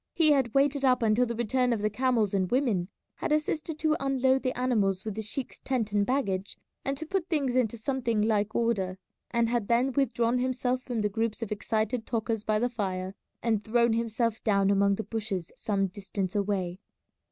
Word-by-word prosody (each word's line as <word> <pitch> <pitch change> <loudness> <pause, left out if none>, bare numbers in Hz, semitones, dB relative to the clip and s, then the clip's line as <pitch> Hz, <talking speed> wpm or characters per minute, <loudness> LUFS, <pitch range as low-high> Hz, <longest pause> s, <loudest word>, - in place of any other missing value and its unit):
He 315 -3 +6
had 265 -5 +2
waited 280 0 +3
up 250 -2 +3
until 225 +3 +3
the 235 - -3
return 245 +2 +1
of 220 -3 -1
the 215 - +2
camels 230 -3 +1
and 190 -2 +1
women, 235 -9 +1 0.3
had - - -3
assisted 305 +1 0
to 310 -1 +2
unload 265 -1 +2
the 255 -2 -2
animals 210 -6 +1
with 215 - -3
the 220 - -4
sheik's 230 +5 -3
tent 240 -6 -1
and 205 -1 +2
baggage, 200 -8 -1 0.3
and 275 0 -2
to 320 - -5
put 375 +1 -2
things 280 -7 0
into 235 -3 +1
something 235 -2 -1
like 215 -1 +1
order, 195 -6 0 0.3
and 235 0 +1
had 235 -3 -1
then 245 +3 +2
withdrawn 250 -2 +1
himself 255 0 0
from 245 -3 -3
the 210 - +1
groups 225 +2 -2
of 220 - -6
excited 220 +2 -1
talkers 225 -2 -1
by 215 0 +1
the 240 +3 +1
fire, 190 -5 -3 0.3
and 220 -3 +1
thrown 235 0 +3
himself 230 0 -1
down 200 -2 +3
among 200 0 +3
the 220 - -4
bushes 210 -7 -4
some 200 -2 0
distance 195 0 -4
away. 195 -3 -1
230 Hz, 195 wpm, -28 LUFS, 205-255 Hz, 0.3 s, He